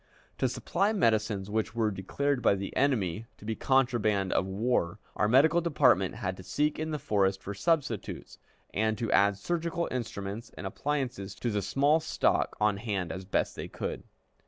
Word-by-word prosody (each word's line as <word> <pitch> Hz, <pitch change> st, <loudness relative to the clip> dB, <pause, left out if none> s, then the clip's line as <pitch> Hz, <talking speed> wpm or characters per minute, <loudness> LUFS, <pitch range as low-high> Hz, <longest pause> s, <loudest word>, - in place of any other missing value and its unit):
To -, -, +2 dB
supply 205 Hz, +2 st, 0 dB
medicines 110 Hz, -, +1 dB
which 110 Hz, +1 st, -2 dB
were 110 Hz, -2 st, +1 dB
declared 125 Hz, +8 st, -1 dB
by 110 Hz, -, +4 dB
the 100 Hz, 0 st, -5 dB
enemy 115 Hz, -7 st, +1 dB
to -, -, -13 dB
be 110 Hz, -, -1 dB
contraband 115 Hz, -8 st, +2 dB
of 95 Hz, -, +1 dB
war, 100 Hz, -2 st, 0 dB, 0.2 s
our 105 Hz, -, +2 dB
medical 145 Hz, +8 st, +5 dB
department 125 Hz, -, +3 dB
had 90 Hz, -1 st, -3 dB
to 95 Hz, -, -10 dB
seek 150 Hz, +9 st, 0 dB
in 155 Hz, 0 st, -2 dB
the 155 Hz, -, -1 dB
forest 95 Hz, -6 st, +1 dB
for 100 Hz, -, -4 dB
substitutes, 120 Hz, -, -1 dB, 0.3 s
and 110 Hz, +1 st, +1 dB
to 115 Hz, +1 st, -2 dB
add 100 Hz, 0 st, +4 dB
surgical 170 Hz, +7 st, -2 dB
instruments 110 Hz, -2 st, -4 dB
and -, -, -6 dB
appliances 120 Hz, -3 st, -3 dB
to 120 Hz, +3 st, -2 dB
the 105 Hz, -1 st, 0 dB
small 140 Hz, -, +3 dB
stock 160 Hz, -, +1 dB
on 105 Hz, -1 st, +2 dB
hand 100 Hz, -5 st, -2 dB
as 95 Hz, 0 st, -6 dB
best 95 Hz, -, 0 dB
they -, -, -5 dB
could. -, -, -4 dB
110 Hz, 175 wpm, -29 LUFS, 100-140 Hz, 0.3 s, medical